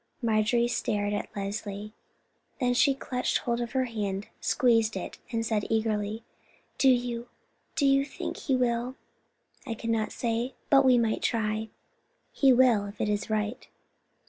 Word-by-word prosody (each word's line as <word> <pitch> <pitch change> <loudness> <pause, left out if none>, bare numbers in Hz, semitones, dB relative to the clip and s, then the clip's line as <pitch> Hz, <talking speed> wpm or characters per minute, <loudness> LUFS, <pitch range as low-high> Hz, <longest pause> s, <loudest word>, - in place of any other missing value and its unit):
Marjorie 230 +1 +2
stared 205 -3 -1
at 205 - -3
Leslie, 205 +1 -5 0.7
then 250 -2 +2
she 275 +2 +4
clutched 250 -2 -1
hold 235 -1 -1
of 240 +1 -4
her 260 -1 +2
hand, 205 -4 -3
squeezed 225 -4 +2
it, 185 - -6
and 225 -1 -1
said 215 -2 0
eagerly: 220 0 -1 0.6
"Do 270 - +6
you—do 245 +2 -2
you 275 0 +4
think 280 - -6
He 270 - 0
will?" 245 0 0 0.7
"I 230 - -2
cannot 225 -1 -1
say; 235 +2 -2 0.2
but 275 -1 +7
we 255 -2 +5
might 225 -2 +1
try. 220 -1 -1 0.6
He 270 -2 +4
will, 240 -5 +4
if 200 +1 -11
it 215 - 0
is 205 0 -1
right." 215 +1 -2
230 Hz, 145 wpm, -28 LUFS, 215-245 Hz, 0.7 s, but